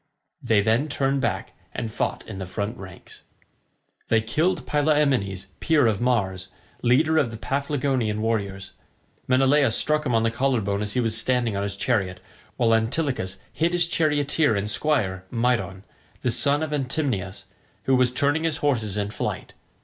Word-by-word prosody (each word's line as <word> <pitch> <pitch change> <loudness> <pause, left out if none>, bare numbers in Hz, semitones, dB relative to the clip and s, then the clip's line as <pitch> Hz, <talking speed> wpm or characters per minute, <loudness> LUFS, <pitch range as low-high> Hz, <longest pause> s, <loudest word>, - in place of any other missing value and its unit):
They 110 -2 +3
then 115 +8 +1
turned 135 -1 0
back 120 - -2 0.2
and 115 -2 -3
fought - - -2
in 100 -3 -7
the 95 - -5
front 100 +5 -3
ranks. 95 -5 -12 0.9
They 115 - +3
killed 155 +10 0
Pylaemenes 140 -11 +1
peer 155 -5 +3
of 110 -2 +1
Mars, 95 -7 0 0.3
leader 155 +6 +3
of 135 -6 +1
the 115 - -7
Paphlagonian 135 -4 -1
warriors. 100 -3 -2 0.6
Menelaus 135 -1 +3
struck 150 0 +1
him 125 -5 0
on 115 - +3
the 115 - +1
collar 130 +1 +1
bone 100 0 -2
as 105 -1 -3
he - - 0
was 115 -2 0
standing 120 -1 0
on 100 - -1
his 100 0 -3
chariot, 100 -5 -1 0.4
while 115 -2 +3
Antilochus 115 - 0 0.2
hit 165 +2 0
his 175 -1 +2
charioteer 150 -5 +2
and 100 +1 -1
squire 105 -13 0
Mydon, 115 -5 0 0.4
the 125 - +1
son 140 +6 +1
of 155 - -3
Atymnius, 130 - -2 0.4
who 135 - +3
was 125 -1 +3
turning 145 +5 +1
his 160 -3 +1
horses 115 -8 0
in 100 0 -2
flight. - - -4
120 Hz, 165 wpm, -24 LUFS, 105-145 Hz, 0.9 s, They